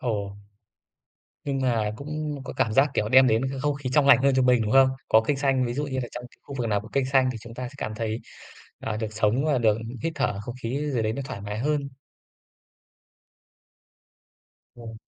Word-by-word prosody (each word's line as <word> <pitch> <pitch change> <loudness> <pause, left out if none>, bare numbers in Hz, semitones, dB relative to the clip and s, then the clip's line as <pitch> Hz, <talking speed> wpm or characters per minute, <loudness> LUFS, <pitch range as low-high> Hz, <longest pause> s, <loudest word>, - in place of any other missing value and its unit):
Ồ. 100 -4 -3 1.1
Nhưng 135 -2 -2
mà 115 -5 +1
cũng 150 0 -5
có - - -6
cảm 110 - +1
giác, 135 +5 +4
kiểu, 105 - 0
đem 130 +2 +7
đến 115 0 +2
cái 135 - -5
không 145 0 0
khí 135 -2 -5
trong 145 -2 +4
lành 140 - +8
hơn 140 -1 +4
cho 130 - +3
mình, 125 -2 +4
đúng 105 - -1
không? 135 0 +7 0.2
Có 110 - +6
cây 135 +5 -1
xanh, 135 -2 +1
ví 120 - -2
dụ 145 +2 -1
như 130 -2 -3
là 120 -2 -3
trong 120 0 -7
cái - - -23
khu 140 - -9
vực 120 - -1
nào 105 -1 +1
có 110 - -12
cây 135 -1 +1
xanh 130 0 +3
thì 115 - -7
chúng 115 0 -11
ta 125 0 -5
sẽ 140 - -16
cảm 110 - -4
thấy, 110 0 -2 0.6
à, 110 -1 -3
được 110 -1 -4
sống 110 +6 +1
và 145 -4 +2
được 110 -3 +3 0.3
hít 165 - -1
thở 125 -8 -1
không 120 +4 -7
khí 140 +5 -2
gì 120 - +1
đấy 110 0 0
nó 140 - -4
thoải 100 -8 -7
mái 105 +1 -5
hơn. 145 +1 -1 2.9
Rồi. 115 -2 -10
125 Hz, 225 wpm, -25 LUFS, 110-140 Hz, 2.9 s, lành